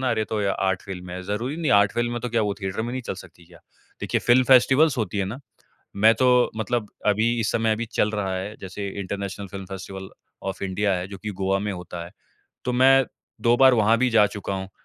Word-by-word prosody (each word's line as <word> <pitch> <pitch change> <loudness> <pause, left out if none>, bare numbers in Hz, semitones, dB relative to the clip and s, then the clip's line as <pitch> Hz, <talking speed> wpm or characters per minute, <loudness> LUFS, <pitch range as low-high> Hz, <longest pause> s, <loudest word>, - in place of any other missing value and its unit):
ना? 130 -1 0
अरे 110 -1 0
तो 110 0 -3
ये 100 - +1
आर्ट 95 -1 0
फिल्म 90 -2 -8
है, 90 +1 -6
ज़रूरी 115 - -3
नहीं 165 -4 -1
है - - +6
आर्ट 100 -1 +4
फिल्म 120 0 0
है 120 - -3
तो 125 - -3
क्या 115 -1 +1
वो 105 - 0
थिएटर 95 +3 -3
में 120 +2 -4
नहीं 130 - -4
चल 115 - -4
सकती 90 -2 -14
क्या? 85 -1 -17 0.4
देखिए - - -1
फिल्म 125 +2 +6
फेस्टिवल्स 135 +3 +5
होती 105 -2 -2
है 95 - +1
ना। 105 +7 -5 0.6
मैं 110 +3 +5
तो 125 -1 +3
मतलब 110 -1 -2 0.2
अभी 110 +3 +3
इस 110 - 0
समय 115 0 +1
अभी 115 +2 -3
चल 105 - +2
रहा 95 -3 -2
है 100 +4 -5
जैसे 100 +1 -6
international 100 +1 -5
film 95 -1 -7
festival 95 0 -8 0.4
of 95 - -9
India 100 +1 0
है 90 +1 -4
जो 100 0 -9
कि 105 +2 -6
गोवा 95 +1 +1
में 105 +1 -2
होता 90 -2 -7
है। 85 - -12 0.5
तो 125 - 0
मैं 135 +1 +5 0.4
2 120 +1 +3
बार 130 -1 +8
वहाँ 110 0 +4
भी 125 +1 +2
जा 115 -3 +5
चूका 100 -1 -5
हूँ। 95 0 -5
105 Hz, 245 wpm, -24 LUFS, 95-120 Hz, 0.6 s, बार